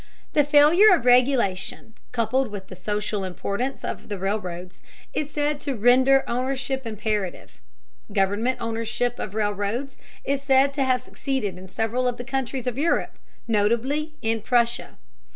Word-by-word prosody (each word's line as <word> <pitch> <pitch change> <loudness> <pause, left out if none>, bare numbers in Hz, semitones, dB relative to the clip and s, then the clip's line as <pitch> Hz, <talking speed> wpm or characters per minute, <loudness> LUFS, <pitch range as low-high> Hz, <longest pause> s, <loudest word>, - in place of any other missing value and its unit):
The 295 - +5
failure 300 +9 +6
of 240 - -5
regulation, 245 -5 +2 0.2
coupled 250 +2 +1
with 200 -3 -8
the 185 - -8
social 210 +2 -2
importance 200 +8 -3
of - - -6
the 205 - -3
railroads, 185 -2 -4 0.3
is 300 -1 -2
said 295 0 -1
to 280 -2 -3
render 260 +4 +5
ownership 265 +1 -2
imperative. 210 -3 -3 0.5
Government 205 +6 +1
ownership 230 +1 -2
of 205 0 -5
railroads 210 +5 -2 0.3
is 275 0 0
said 275 0 +3
to 275 -1 0
have 255 -1 +1
succeeded 265 -9 -3
in 185 +1 -11
several 225 +5 -1
of 245 -1 -1
the 245 - -6
countries 265 -1 -3
of 250 +1 -2
Europe, 335 +3 +1 0.3
notably 240 +8 0
in 225 0 0
Prussia. 240 +2 0
240 Hz, 145 wpm, -24 LUFS, 210-270 Hz, 0.5 s, failure